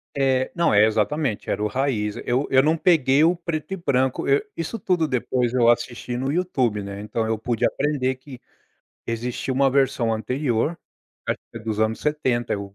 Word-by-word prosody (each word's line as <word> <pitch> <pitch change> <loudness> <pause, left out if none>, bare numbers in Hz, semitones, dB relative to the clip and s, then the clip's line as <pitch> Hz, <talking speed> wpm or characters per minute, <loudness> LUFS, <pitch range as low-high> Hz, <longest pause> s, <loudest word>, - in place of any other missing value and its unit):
É. 130 -2 +1
Não, 170 -6 +2
é 105 +1 +6
exatamente, 110 +3 -1
era - - -1
o - - +2
raiz. 105 -3 -1
Eu 130 +4 0
eu 130 - +5
não 155 +2 +2
peguei 150 -4 +4
o 170 +2 +4
preto 170 0 -4
e - - -3
branco, 130 -6 0
eu 140 +1 +4
isso 165 +8 -4
tudo, 175 -4 +1
depois 125 -2 0
eu 120 -2 +4
assisti 120 +1 -1
no 135 +2 -1
YouTube, 130 - 0
né. 100 0 -7
Então 110 +2 -2
eu 110 0 0
pude 115 0 -1
aprender 135 -3 0
que 130 -1 -12 0.7
existia 120 +3 -3
uma 135 +1 +3
versão 130 -4 +1
anterior, 125 +6 -1 0.5
acho - - 0
que - - -6
dos 110 0 -3
anos 110 0 0
70, 130 -6 0
eu 100 -1 -5
130 Hz, 185 wpm, -23 LUFS, 115-150 Hz, 0.7 s, é